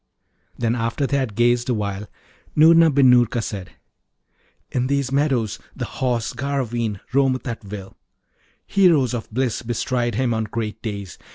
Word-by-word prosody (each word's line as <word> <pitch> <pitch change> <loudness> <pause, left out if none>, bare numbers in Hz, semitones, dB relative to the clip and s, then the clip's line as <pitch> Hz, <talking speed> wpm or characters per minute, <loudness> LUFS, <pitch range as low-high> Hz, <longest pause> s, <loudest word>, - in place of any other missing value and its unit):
Then, 115 -1 0
after 115 +4 -1
they 140 +1 0
had 130 -7 -2
gazed 120 +1 +2
awhile, 105 -3 -2 0.5
Noorna 165 +1 +7
bin 135 -3 +5
Noorka 120 -1 +3
said, 100 -5 -5 1.0
'In 125 0 0
these 140 -1 0
meadows 135 -7 0 0.2
the - - -3
Horse 120 -3 -2
Garraveen 120 -6 -2
roameth 135 -1 +2
at 115 -2 -5
will. 100 -1 -8 0.7
Heroes 165 - +3
of 120 -3 -4
bliss 125 0 -1
bestride 120 0 -1
him 125 0 +1
on 110 0 -1
great 110 0 -4
days. 100 -8 -6
120 Hz, 145 wpm, -22 LUFS, 110-135 Hz, 1.0 s, Noorna